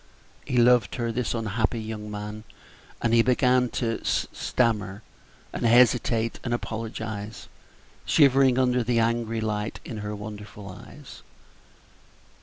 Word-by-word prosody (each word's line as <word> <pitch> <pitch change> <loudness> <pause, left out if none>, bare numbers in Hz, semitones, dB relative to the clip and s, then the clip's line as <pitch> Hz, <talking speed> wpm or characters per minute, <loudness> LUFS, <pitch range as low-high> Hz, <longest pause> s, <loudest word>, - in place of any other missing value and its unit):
He 125 - -1
loved 120 -5 +4
her, 115 -1 -2
this 120 +1 -2
unhappy 115 +1 -1
young 110 -1 -6
man, 105 +1 -6 0.6
and 115 -1 +2
he 115 - +6
began 125 0 +3
to 115 -3 -2
stammer, 105 -4 -1 0.5
and - - -4
hesitate, 115 -1 +3
and 120 -2 0
apologize, 110 -2 -6 0.6
shivering 135 -3 +4
under 125 -1 +2
the 120 +1 0
angry 115 0 0
light 105 -1 -3
in 115 - -6
her 105 0 -4
wonderful 105 -1 -9
eyes. - - -12
115 Hz, 120 wpm, -26 LUFS, 105-120 Hz, 0.6 s, he